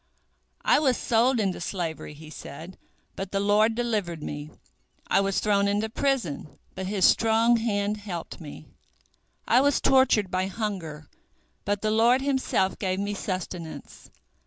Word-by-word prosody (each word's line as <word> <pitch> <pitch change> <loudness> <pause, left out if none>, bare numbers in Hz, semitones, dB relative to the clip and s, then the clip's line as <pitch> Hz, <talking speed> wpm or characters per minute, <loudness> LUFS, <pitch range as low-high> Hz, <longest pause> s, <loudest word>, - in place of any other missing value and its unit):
"I - - +5
was 265 -5 +2
sold 240 +2 +2
into 195 -5 -1
slavery," 165 -4 -4
he 155 +1 -12
said, 160 +5 -10 0.4
"but 195 -1 -5
the 195 - 0
Lord 210 +3 +3
delivered 210 -9 -2
me; 145 0 -6 0.6
I - - +3
was 195 -1 0
thrown 200 -1 +2
into 205 +2 0
prison, 225 - -2 0.2
but 190 0 -5
His 195 -2 +2
strong 225 +1 +4
hand 210 -2 -1
helped 185 -5 -7
me. 145 - -10 0.8
I 250 - +5
was 285 0 +3
tortured 250 -7 +3
by 185 +1 0
hunger, 185 -8 -5 0.6
but 205 0 -1
the 215 - +1
Lord 235 +4 +4
Himself 265 -8 0
gave 185 -2 -1
me 205 +1 -2
sustenance. 185 -4 -6
200 Hz, 145 wpm, -26 LUFS, 180-225 Hz, 0.8 s, I